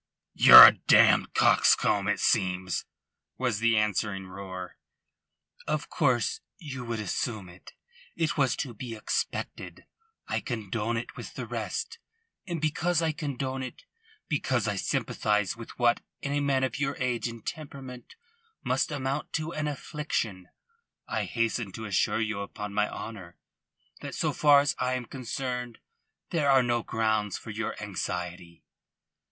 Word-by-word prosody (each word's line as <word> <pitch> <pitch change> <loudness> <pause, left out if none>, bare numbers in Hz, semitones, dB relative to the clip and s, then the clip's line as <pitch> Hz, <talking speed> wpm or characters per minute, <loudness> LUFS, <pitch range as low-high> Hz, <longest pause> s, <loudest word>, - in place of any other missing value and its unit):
"Ye're - - +12
a - - +10
damned - - +4
coxcomb, - - +4
it - - +1
seems," 90 -1 0 0.5
was 120 -5 -1
the 115 -1 +3
answering 105 -2 0
roar. 95 -1 -8 0.9
"Of - - -2
course 450 -1 +1 0.2
you 140 - -7
would 115 -2 -3
assume 105 0 -3
it. 90 +2 -15 0.4
It 160 -2 0
was 135 -4 +2
to 130 -5 -4
be 115 +1 -7
expected. 105 - -4 0.4
I - - -1
condone 115 -1 -3
it 115 - -6
with - - -9
the - - -5
rest. 460 - -4 0.5
And 170 -3 -3
because 160 +2 0
I 160 - +1
condone 135 -3 -4
it, 130 - -8 0.4
because 130 -6 0
I 105 - 0
sympathise 105 +1 0
with 115 -1 -11
what 120 -1 +2 0.2
in 140 - -2
a 145 - +1
man 140 -2 +1
of 130 - -2
your 140 -1 -1
age 125 -2 -1
and 115 -2 -9
temperament 135 - -8 0.5
must - - 0
amount 140 0 -3
to 160 +1 -2
an 155 -1 -2
affliction, 125 -10 -4 0.6
I - - -2
hasten 115 -2 -1
to 110 - -6
assure 105 +1 +1
you 110 -2 -2
upon 100 0 -6
my 105 +1 +1
honour 95 -6 -8 0.6
that - - -7
so - - 0
far 145 -2 +6
as 145 - 0
I 130 0 0
am 125 -1 -4
concerned 125 -1 -5 0.5
there 150 -4 +1
are 135 -2 +5
no 120 -1 0
grounds 110 -3 -1
for 110 - -9
your 110 +1 -3
anxiety." 90 -4 -5
120 Hz, 145 wpm, -28 LUFS, 105-140 Hz, 0.9 s, Ye're